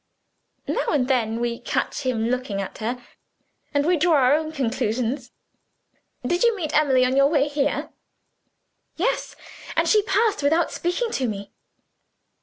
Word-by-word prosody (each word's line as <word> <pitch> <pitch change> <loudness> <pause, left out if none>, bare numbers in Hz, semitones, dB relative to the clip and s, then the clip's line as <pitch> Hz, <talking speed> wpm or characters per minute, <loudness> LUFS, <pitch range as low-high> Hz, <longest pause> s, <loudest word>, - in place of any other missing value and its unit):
Now - - -1
and 270 -5 +1
then 230 -4 0
we 235 0 -2
catch - - -2
him 235 -3 0
looking 250 -5 -2
at 195 - -6
her 235 +3 -3 0.7
and 285 -1 +1
we 350 +1 +3
draw 335 +2 +3
our 265 -1 +4
own 310 +1 0
conclusions." 250 -1 -2 1.0
"Did 350 +7 0
you 470 -2 +4
meet 315 -6 -3
Emily 265 -4 +4
on 255 +1 0
your 275 0 +5
way 290 -1 +2
here?" 290 0 -1 1.0
"Yes, - - -1 0.4
and - - +2
she 430 - +5
passed 420 0 +1
without 320 +4 +2
speaking 360 +7 -2
to 260 - -1
me." 200 -2 -6
275 Hz, 150 wpm, -23 LUFS, 245-320 Hz, 1.0 s, your